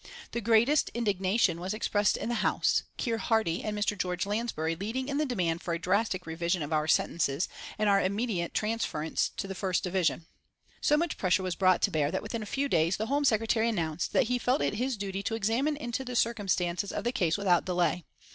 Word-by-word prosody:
The 235 - -3
greatest 235 +7 +3
indignation 195 -4 +1
was 190 +3 -3
expressed 205 -1 +1
in - - -4
the 240 0 -1
House, - - +2 0.2
Keir 230 -2 -1
Hardie 220 -8 0
and 210 -1 -3
Mr. 210 0 0
George 180 -2 -2
Lansbury 205 -7 -1
leading 225 +9 -3
in 285 0 -1
the 305 - +1
demand 170 -9 -1
for 170 - -2
a - - -4
drastic 185 +1 0
revision 170 +1 -1
of 145 +2 -4
our 155 0 +1
sentences 155 -1 +1 0.3
and 215 0 +1
our 200 -1 +4
immediate 200 -3 -1
transference 210 -8 -1
to 195 - -3
the 195 - -4
first 185 -1 -1
division. 175 -3 0 0.6
So 295 - +3
much 335 0 -1
pressure 185 0 +2
was 185 -1 -1
brought 185 0 +3
to - - +3
bear 150 -2 +1
that 190 - -3
within 230 - -4
a 210 - -6
few 275 +6 -1
days 165 - +2
the 220 - -2
Home 285 +4 0
Secretary 225 -1 +2
announced 165 -6 -2
that - - +4
he 245 +2 -1
felt 250 +3 +1
it - - 0
his 250 +3 -1
duty 195 -1 -3
to 225 +3 -2
examine 235 +8 0
into 240 -2 -3
the 250 -1 -6
circumstances 195 -5 0
of 205 - -3
the 240 - 0
case 180 -10 +1
without 185 -4 +2
delay. 180 -1 0
200 Hz, 215 wpm, -29 LUFS, 175-230 Hz, 0.6 s, our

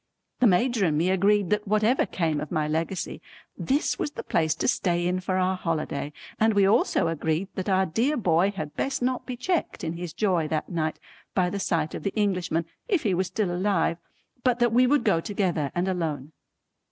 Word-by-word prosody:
The 250 - +5
Major 220 +2 +3
and 150 -2 +1
me 175 +4 +2
agreed 200 0 +2
that 210 0 0
whatever 215 +5 +2
came 160 -4 -1
of 150 - -5
my 155 -1 0
Legacy 165 +4 -3 0.3
this 280 +3 0
was - - -1
the - - -7
place 160 -2 +1
to - - -1
stay 175 -2 +1
in 180 +1 0
for 185 0 -1
our 185 0 +1
holiday, 155 -5 -3 0.3
and 220 -1 +3
we 200 -1 +5
also 200 -4 +3
agreed 165 +3 -1
that 190 +2 -3
our 190 0 +3
dear 240 - 0
boy 180 -3 +3
had 155 -7 -6
best 265 -2 -1
not 255 0 -1
be 250 -2 -4
checked 350 +7 -2
in 160 - -2
his 175 0 -6
joy 180 -6 +1
that 155 -1 -2
night 160 -3 -2 0.4
by 180 -2 +2
the 200 - -3
sight 160 -4 0
of - - -5
the 200 - -3
Englishman 180 -6 0 0.2
if 380 -9 +1
he 200 - +1
was 185 +1 0
still 205 -4 -1
alive, 180 -3 +1 0.4
but 250 -2 +3
that 240 -2 +2
we 250 +2 +5
would 290 +2 +3
go 200 -6 +3
together 180 -8 -1
and 175 +2 0
alone. 160 -6 -2
185 Hz, 205 wpm, -26 LUFS, 165-215 Hz, 0.4 s, The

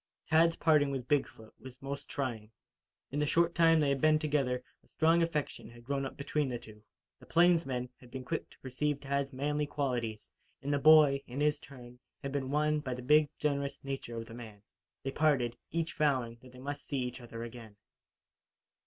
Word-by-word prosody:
Tad's 165 +1 +5
parting 150 -4 +3
with 130 -3 -4
Big 145 -2 +2
foot 110 0 -16
was 130 0 -12
most 140 +1 -6
trying. 120 -6 -3 0.6
In 145 - -2
the 150 - +1
short 170 +3 +3
time 165 -1 +5
they 145 -2 +2
had 140 -1 0
been 155 0 +5
together, 140 -5 0 0.2
a - - -27
strong 165 +1 +3
affection 155 -8 -2
had 120 0 -14
grown 135 +1 -1
up - - -11
between 140 0 -1
the 125 - -2
two. 110 -2 -14 0.4
The - - -16
plainsman 165 -8 +3
had 125 - -16
been 130 0 -7
quick 160 +3 -3
to - - -19
perceive 140 +3 -1
Tad's 140 0 -2
manly 145 +2 -1
qualities, 120 -7 -3 0.3
and 145 +1 -1
the 145 - +2
boy, 150 -2 +7
in 125 +3 -6
his 150 0 +2
turn, 125 -5 -13 0.2
had 140 - -3
been 135 -2 -2
won 150 +1 +2
by 130 -4 -4
the 125 - -8
big, 150 +2 +5
generous 140 -2 -1
nature 135 -4 -5
of 115 - -4
the 115 - -11
man. 110 -4 -10 0.4
They 135 - -2
parted, 135 -6 +2
each 165 0 -2
vowing 130 -7 0
that 130 - -14
they 125 - -13
must 145 +2 -5
see 140 - -3
each 125 0 -3
other 115 -1 -7
again. 115 -3 -9
140 Hz, 200 wpm, -32 LUFS, 125-150 Hz, 0.6 s, boy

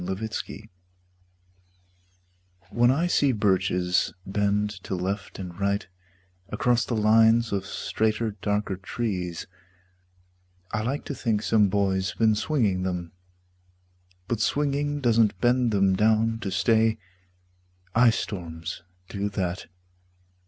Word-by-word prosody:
BIRCHES 100 +2 -5 2.1
When 120 0 +3
I 150 +7 +2
see 145 -5 +3
birches 95 -3 +1
bend 105 +1 0
to 95 - -3
left 95 +3 -4
and 90 -3 -7
right 100 +1 0 0.6
Across 120 +3 +1
the 120 - -2
lines 110 +2 +4
of 95 -1 -2
straighter 110 0 -1
darker 105 -2 -1
trees, 95 -4 -3 1.3
I 110 - -1
like 130 +6 -3
to - - -4
think 110 -5 -1
some 105 -3 +3
boy's 95 -2 0
been 110 -1 +3
swinging 105 -5 0
them. 90 -2 -3 1.2
But 115 0 -1
swinging 145 +2 0
doesn't 115 -6 +3
bend 120 +2 +3
them 95 -3 +2
down 110 +2 +2
to 100 - -4
stay. 110 +3 +2 1.0
Ice 115 -1 +5
storms 85 -4 -5 0.3
do 100 +1 -3
that. 95 -2 -3
105 Hz, 110 wpm, -26 LUFS, 95-115 Hz, 2.1 s, Ice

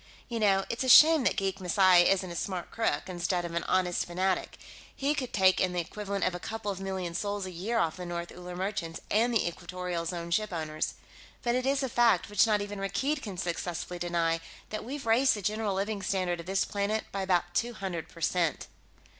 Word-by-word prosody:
You 235 -1 -2
know, 195 -2 +3
it's 235 +3 -2
a 260 - 0
shame 310 0 +8
that - - +3
geek 195 -1 -2
messiah 185 0 +5
isn't 185 0 +2
a - - -6
smart 180 0 -4
crook, 225 -1 0
instead 180 0 -1
of 170 - -6
an 170 - -1
honest 180 -2 +1
fanatic; 185 +2 -1 0.4
he 280 +2 +1
could 265 -4 -3
take 190 -2 +4
in 185 -1 +1
the 180 - 0
equivalent 200 +3 -3
of 185 - +1
a 180 - -4
couple 220 +3 -4
of 190 - -6
million 190 -3 -3
sols 200 +2 -2
a 185 - -6
year 195 +7 -2
off 165 -7 +1
the 180 - -6
North 170 0 -4
Uller 180 0 -8
merchants 185 -3 -3
and 230 +3 +3
the 225 -7 +2
Equatorial 180 0 -4
Zone 170 -1 -4
shipowners. 165 -6 -1 0.5
But 240 -1 +1
it 255 +1 0
is 275 0 +1
a - - +1
fact, 230 -6 +3
which 215 +2 +4
not 210 -2 +2
even 205 0 -6
Rakkeed 270 +10 -1
can 200 -7 -6
successfully 175 0 -3
deny, 165 -1 0 0.3
that 215 - -4
we've 270 +4 -6
raised 235 +4 +4
the 205 - -5
general 210 0 -1
living 200 +1 -2
standard 185 -2 -1
of 170 - -8
this 195 +1 +1
planet 205 +1 -1
by 195 - -3
about 175 -2 +1
two 240 +6 0
hundred 185 -5 -5
percent." 170 -1 -1
190 Hz, 215 wpm, -29 LUFS, 175-215 Hz, 0.5 s, shame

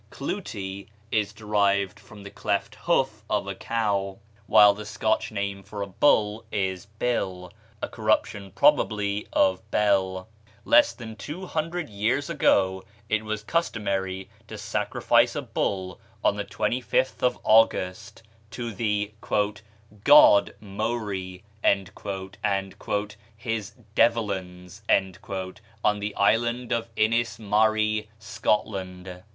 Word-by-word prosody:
"Clootie" 95 0 -5 0.2
is 105 -2 +1
derived 100 -2 0
from 105 -1 -14
the 100 - -9
cleft - - -2
hoof - - 0
of - - 0
a - - -4
cow; 100 -4 -1 0.3
while 105 -2 +7
the 105 +1 -8
Scotch 110 +1 -1
name 100 -1 -3
for 100 +1 -6
a - - -3
bull 105 +1 +2
is 95 -2 -2
Bill, 95 -7 -2 0.3
a - - 0
corruption, 110 -3 -1
probably, 105 -1 +2
of 95 -1 +2
Bel. 95 -2 +1 0.4
Less 295 -1 +6
than 110 -2 -9
two 150 - -7
hundred 165 0 -3
years 115 +7 -1
ago 95 -1 +2 0.3
it 110 0 +1
was 110 0 -4
customary 95 - -1 0.2
to - - -8
sacrifice - - +1
a - - -1
bull 95 -2 -3 0.2
on - - +3
the - - -3
25th 125 +1 -1
of 125 - +2
August 110 -3 +2 0.3
to 120 -1 -5
the 105 0 -1
"God 105 +2 +3
Mowrie" 100 -3 -4 0.2
and 100 0 +2 1.5
"his 110 -2 -4 0.2
devilans" 95 -5 0 1.0
on 105 0 +2
the 105 +1 -4
island 120 +4 +1
of 115 0 -1
Inis 115 +2 +1
Maree, 110 0 +1
Scotland. 95 -3 -2
105 Hz, 115 wpm, -26 LUFS, 100-110 Hz, 1.5 s, while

